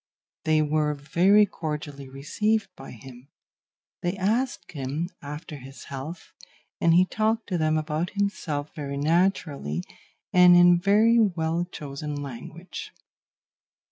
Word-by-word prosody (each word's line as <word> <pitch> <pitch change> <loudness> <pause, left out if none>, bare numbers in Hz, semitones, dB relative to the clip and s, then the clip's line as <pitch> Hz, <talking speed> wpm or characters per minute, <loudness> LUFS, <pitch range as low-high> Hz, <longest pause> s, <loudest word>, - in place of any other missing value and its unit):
They 155 -1 +3
were 150 0 +1
very 185 +9 +4
cordially 150 -6 -6
received 210 +11 -1
by - - -11
him; 125 +2 -12 0.7
they 175 +2 -2
asked 225 +7 -1
him 145 +4 -3
after 150 +2 -7
his 135 +1 -11
health, 145 +5 -8 0.5
and 165 0 +4
he 180 +1 +6
talked 220 +3 0
to 180 - 0
them 155 0 +2
about 155 +2 -2
himself 155 -8 -2
very 140 -3 -5
naturally 150 - 0 0.5
and 180 -1 +8
in 175 0 +7
very 215 +5 +4
well 170 -5 +1
chosen 145 +1 -6
language. 160 - -8
160 Hz, 120 wpm, -26 LUFS, 145-185 Hz, 0.7 s, and